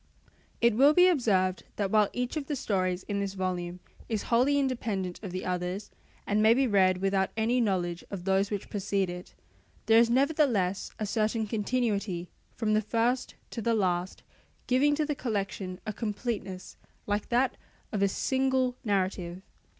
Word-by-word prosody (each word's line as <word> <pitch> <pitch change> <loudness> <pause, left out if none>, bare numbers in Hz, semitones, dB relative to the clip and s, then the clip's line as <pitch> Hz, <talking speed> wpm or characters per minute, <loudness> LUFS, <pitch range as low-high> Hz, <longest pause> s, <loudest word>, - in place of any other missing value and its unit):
It 235 -1 +5
will 280 +7 +5
be 360 0 +7
observed 195 - +2
that 200 -2 -1
while 210 -2 +4
each 250 +2 -3
of 295 -3 -3
the 295 - -1
stories 185 -7 -1
in 205 -1 -3
this 200 -1 -3
volume 180 -1 -3 0.3
is 220 -3 -1
wholly 265 +5 +4
independent 220 -9 -1
of 200 - -6
the 185 +1 -4
others 180 +2 -3 0.3
and 210 +1 +1
may 220 +2 +6
be 270 +1 +3
read 190 -5 +3
without 195 -1 +2
any 235 +3 +2
knowledge 180 -5 -1
of 190 -3 -6
those 195 +1 +2
which 205 -2 -4
precede 195 -2 -1
it, 180 0 -9 0.5
there 225 0 +6
is 230 0 +4
nevertheless 245 - +2
a 215 - -2
certain 215 +2 0
continuity 210 -5 -1 0.2
from 215 -2 0
the 215 - +3
first 235 +4 0 0.2
to 230 - -4
the 230 +1 +1
last, 180 -3 -1 0.4
giving 280 +4 +3
to 305 0 0
the 295 - -1
collection 200 -7 -3
a 215 - -3
completeness 205 -4 -4 0.3
like 205 0 -2
that 250 +2 +2 0.4
of 205 - -1
a 200 - +5
single 260 +3 +1
narrative. 190 -4 -1
210 Hz, 165 wpm, -29 LUFS, 190-245 Hz, 0.5 s, be